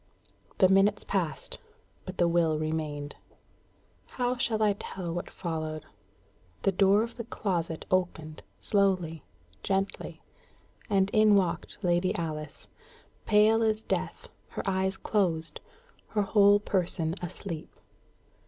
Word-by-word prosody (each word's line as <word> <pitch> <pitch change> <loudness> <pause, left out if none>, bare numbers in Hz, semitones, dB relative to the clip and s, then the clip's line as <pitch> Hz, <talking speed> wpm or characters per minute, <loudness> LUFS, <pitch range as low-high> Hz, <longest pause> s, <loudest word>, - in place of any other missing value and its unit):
The 185 - +6
minutes 195 +2 +3
passed, 165 -8 -3 0.5
but 185 - -6
the 175 - +3
will 165 -2 +2
remained. 155 -2 -3 0.9
How 250 0 -1
shall 230 -3 0
I 210 -1 +4
tell 185 -3 -5
what 175 - -4
followed? 155 -3 -4 0.8
The 195 - +3
door 195 +3 +4
of 235 +1 -7
the 235 - -4
closet 175 -7 -3
opened 165 -4 -1 0.2
slowly, 185 -6 +1 0.4
gently 195 0 -2 0.7
and 195 -1 +2
in 215 -1 +5
walked 180 -4 0
Lady 175 +1 +2
Alice, 155 -3 -5 0.6
pale 215 +1 +5
as 220 -1 +1
death, - - -3 0.2
her - - -5
eyes 190 0 0
closed, 165 -8 -1 0.5
her 210 - 0
whole 205 0 +5
person 175 -5 -1
asleep. 175 -1 -6
185 Hz, 115 wpm, -29 LUFS, 165-205 Hz, 0.9 s, The